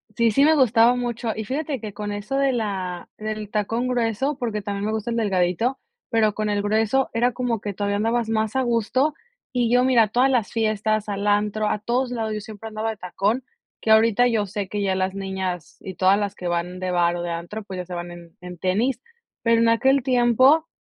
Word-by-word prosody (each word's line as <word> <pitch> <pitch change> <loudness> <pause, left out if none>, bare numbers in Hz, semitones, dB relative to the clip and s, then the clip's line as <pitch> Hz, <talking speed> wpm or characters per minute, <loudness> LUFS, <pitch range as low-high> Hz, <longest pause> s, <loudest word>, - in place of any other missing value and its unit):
Sí, 235 -1 +3
sí 275 +7 +4
me 315 +1 +5
gustaba 240 -2 +5
mucho 240 -2 -2
y 220 - -3
fíjate 275 +3 -3
que 210 -2 -6
con 205 0 -5
eso 205 +6 -4
de 275 -1 +3
la 190 -6 -3
del 215 -1 -5
tacón 225 +4 -1
grueso 250 +3 0
porque 225 -5 -2
también 200 0 -3
me 215 - -1
gusta 220 +2 -3
el 230 - -1
delgadito, 200 +4 0 0.3
pero, 215 -2 +2
con 215 -1 -1
el 205 0 0
grueso 220 +5 +1
era 240 +2 +2
como 240 -3 -2
que 205 -1 -5
todavía 200 +1 -1
andabas 225 +1 0
más 220 +1 0
a 265 - +3
gusto 255 +5 +1 0.4
y 245 -3 0
yo 250 - +5
mira, 235 -5 +4
todas 250 +4 +3
las 240 -5 +1
fiestas, 215 -1 0
al 200 0 -3
antro, 210 +1 +1
a 210 - 0
todos 245 +3 -1
lados 225 -3 -2
yo 210 - -4
siempre 220 +1 -9
andaba 220 +1 -2
de 215 - -9
tacón, 200 +7 -1 0.4
que - - -3
ahorita 225 +2 +5
yo 225 -4 +1
sé 200 0 -4
que 205 +1 -3
ya 190 -1 +1
las 190 0 -1
niñas 190 -4 -4
y 190 - -7
todas 190 +3 +3
las 205 -1 -2
que 180 - -5
van 175 +1 -2
de 185 -1 -2
bar 175 -1 +2
o 175 - -4
de 170 - -3
antro, 175 +6 -5
pues 190 -2 -7
ya 180 - -4
se 180 - -8
van 175 0 -5
en 170 -1 -13
en 180 0 -9
tenis. 225 +7 0 0.4
Pero 230 0 +3
en 230 - +4
aquel 265 +3 +3
tiempo, 255 +6 +4
215 Hz, 225 wpm, -23 LUFS, 200-240 Hz, 0.4 s, me